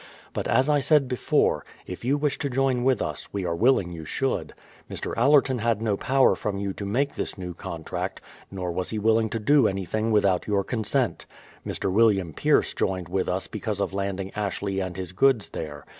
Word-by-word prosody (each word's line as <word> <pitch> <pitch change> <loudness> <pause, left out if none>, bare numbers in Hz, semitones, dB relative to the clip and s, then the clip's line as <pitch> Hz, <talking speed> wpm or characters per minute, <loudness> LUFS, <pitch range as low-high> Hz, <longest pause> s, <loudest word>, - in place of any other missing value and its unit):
But - - -2
as 130 +3 +3
I 150 -1 +3
said 140 -1 +3
before, 125 -1 +1 0.2
if 90 - -8
you 135 +4 +2
wish 145 -1 -1
to 140 - -1
join 130 -1 +1
with 130 -2 +2
us, - - -5
we 100 -2 -3
are 85 -1 -1
willing 105 -3 +3
you 80 -2 -7
should. - - -2 0.3
Mr. - - -4
Allerton 135 0 +4
had 115 -1 +1
no 110 -2 0
power 135 +5 +3
from 105 -2 -3
you 100 -1 -2
to 100 - -6
make 135 +7 0
this - - -4
new 90 -2 -5
contract, 80 -1 -5 0.3
nor 90 -2 -4
was 90 +1 -3
he 110 - -3
willing 110 +1 +2
to 115 - -2
do 130 +3 +4
anything 100 +3 -2
without 100 -4 +2
your 100 -2 +1
consent. 120 +3 -1 0.4
Mr. 95 - -2
William 100 -5 +3
Pierce - - +2
joined 90 -3 -2
with 95 +1 -1
us 95 +1 -1
because 110 -1 -4
of 100 - -1
landing 100 -1 -3
Ashley 100 -1 -2
and 95 -2 -4
his 90 -2 -5
goods 115 +3 +2
there. 75 -3 -7
105 Hz, 200 wpm, -25 LUFS, 95-125 Hz, 0.4 s, Allerton